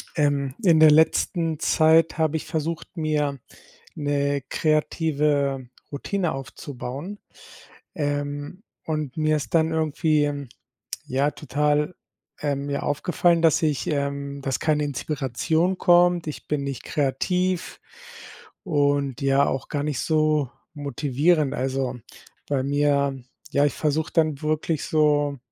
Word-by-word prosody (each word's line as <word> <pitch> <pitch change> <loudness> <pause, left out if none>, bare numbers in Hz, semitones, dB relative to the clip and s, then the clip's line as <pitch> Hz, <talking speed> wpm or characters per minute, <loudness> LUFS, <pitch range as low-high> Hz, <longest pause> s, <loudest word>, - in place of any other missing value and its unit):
Ähm, 140 -3 +1
in 170 -5 +5
der 155 -1 +8
letzten 160 +1 +2
Zeit 160 +1 +4
habe 160 -1 +1
ich - - -7
versucht, 165 +3 -4
mir 150 -3 0 0.6
'ne 145 -1 0
kreative 150 -3 0 0.2
Routine 175 +4 -2
aufzubauen, 135 +6 -7 0.8
ähm, 145 +3 -3 0.2
und 155 -4 -3
mir 155 0 +2
ist 150 - -6
dann 160 0 +3
irgendwie, 155 -1 +1
ähm, 145 -3 -4 0.6
ja 140 +3 +1
total, 150 +3 0 0.5
äh, 145 -1 0
mir 140 +1 -3
aufgefallen, 170 +3 +1
dass 160 -2 +4
ich 150 -4 0
ähm, 140 -1 -2
dass 135 -1 -1
keine 150 -1 +1
Inspiration 150 +5 -1
kommt. 175 -2 +4
Ich 150 - -7
bin 150 -2 -1
nicht 140 -2 -5
kreativ 180 +6 -1 0.8
und, 145 - 0
ja, 140 +1 +3
auch 135 - -2
gar 145 -1 -2
nicht 150 -3 -2
so 155 -3 +1 0.2
motivierend. 145 +1 +1
Also, 130 -1 -2 0.5
bei 140 -2 0
mir, 140 -1 +1 0.3
ja, 140 +1 +3
ich 145 - 0
versuche 155 +1 -1
dann 155 -4 +1
wirklich 155 0 -1
so 145 -2 +2
150 Hz, 120 wpm, -24 LUFS, 140-160 Hz, 0.8 s, der